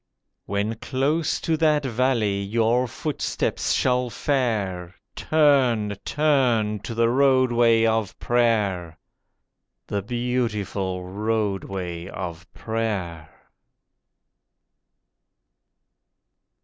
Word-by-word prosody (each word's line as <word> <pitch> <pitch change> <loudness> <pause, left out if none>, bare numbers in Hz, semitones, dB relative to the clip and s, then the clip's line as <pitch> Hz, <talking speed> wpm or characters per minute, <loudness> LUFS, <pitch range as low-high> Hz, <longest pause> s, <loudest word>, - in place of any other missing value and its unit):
When 100 +2 -1
close 145 +7 0
to 165 - 0
that 150 -2 +2
Valley 115 -5 +1
your 115 +5 +1
footsteps 150 +5 -2
shall 125 -1 +1
fare, 105 -9 -1 0.2
Turn, 130 -9 +2
turn 125 -8 +1
to 115 +3 -7
the 115 0 +3
Roadway 120 -3 +4
of 110 -3 0
Prayer— 105 -9 0 0.9
The 100 - -2
beautiful 105 -5 -2
Roadway 95 -4 -3
of 85 -3 -7
Prayer. 95 -8 -3
115 Hz, 75 wpm, -24 LUFS, 100-125 Hz, 0.9 s, Roadway